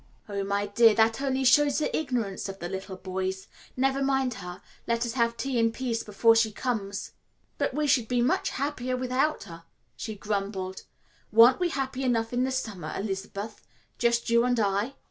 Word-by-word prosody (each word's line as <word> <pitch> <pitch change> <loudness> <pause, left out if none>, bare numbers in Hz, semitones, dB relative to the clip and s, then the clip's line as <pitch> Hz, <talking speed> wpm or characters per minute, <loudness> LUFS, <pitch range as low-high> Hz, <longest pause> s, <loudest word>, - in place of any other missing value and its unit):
"Oh, 200 -1 -3
my 200 +1 -1
dear, 215 +2 +5
that 225 +3 +3
only 265 -1 0
shows 285 +2 +5
the 305 - 0
ignorance 240 -11 -2
of 195 - -7
the 175 - -5
little 190 +1 -6
boys. 190 0 -4 0.3
Never 270 +1 +1
mind 270 -2 +1
her. 180 0 -8 0.3
Let 235 +1 +1
us 235 - -3
have 235 -2 +1
tea 255 +1 -1
in 230 0 +3
peace 230 -1 -2
before 225 +2 +3
she 225 -1 +3
comes." 205 -4 -3 0.5
"But - - 0
we 300 0 +1
should 255 -5 +3
be 245 +1 0
much 240 +2 +1
happier 255 -2 -2
without 255 +4 0
her," 165 -3 -11 0.3
she 220 -2 -6
grumbled. 195 -2 -3 0.5
"Weren't 230 +4 +7
we 355 -1 +1
happy 270 -3 -3
enough 230 -2 0
in 250 +1 +2
the 265 - -2
summer, 205 -12 -4
Elizabeth 200 +1 -5 0.4
just 235 0 +2
you 235 0 +5
and 245 -1 +1
I?" 205 +5 0
230 Hz, 185 wpm, -27 LUFS, 200-255 Hz, 0.5 s, Weren't